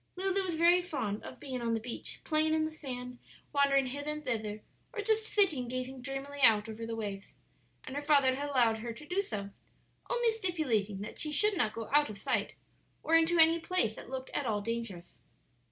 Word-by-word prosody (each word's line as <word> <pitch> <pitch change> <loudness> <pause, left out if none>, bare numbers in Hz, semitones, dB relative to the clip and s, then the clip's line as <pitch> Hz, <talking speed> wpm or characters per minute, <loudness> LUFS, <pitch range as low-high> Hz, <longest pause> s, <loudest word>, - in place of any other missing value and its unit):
Lulu 385 +1 +2
was 355 -3 -2
very 345 +2 +5
fond 220 - -3
of - - -9
being 260 -3 -5
on 230 -1 0
the - - -1
beach, 230 +1 -6
playing 315 0 +2
in 315 0 +2
the 315 - -3
sand, 250 -5 -6 0.3
wandering 280 -1 +4
hither 285 +3 -4
and 300 0 -4
thither, 215 -4 -3 0.3
or 450 -4 -3
just 440 +1 +2
sitting 315 - +2
gazing 255 +1 -4
dreamily 270 +2 -5
out 220 -3 +6
over 225 +1 -6
the 230 - -3
waves; 200 -3 -6 0.5
and 260 - -7
her 290 - -1
father 285 -3 +4
had 285 +2 -3
allowed 235 -5 +3
her 230 +1 -5
to 265 +6 -11
do 360 +6 0
so, 200 - -5 0.6
only 485 -2 +3
stipulating 270 - -1
that 210 - -7
she 305 - -1
should 420 +8 +3
not 215 -11 0
go 225 -1 -5
out 295 0 +5
of 210 - -7
sight - - -1 0.5
or 320 - -1
into 330 +1 +5
any 325 +1 +6
place 325 -11 +1
that - - -10
looked 260 0 -5
at 285 - -2
all 210 -2 +1
dangerous. 205 - -5
270 Hz, 205 wpm, -32 LUFS, 230-320 Hz, 0.6 s, out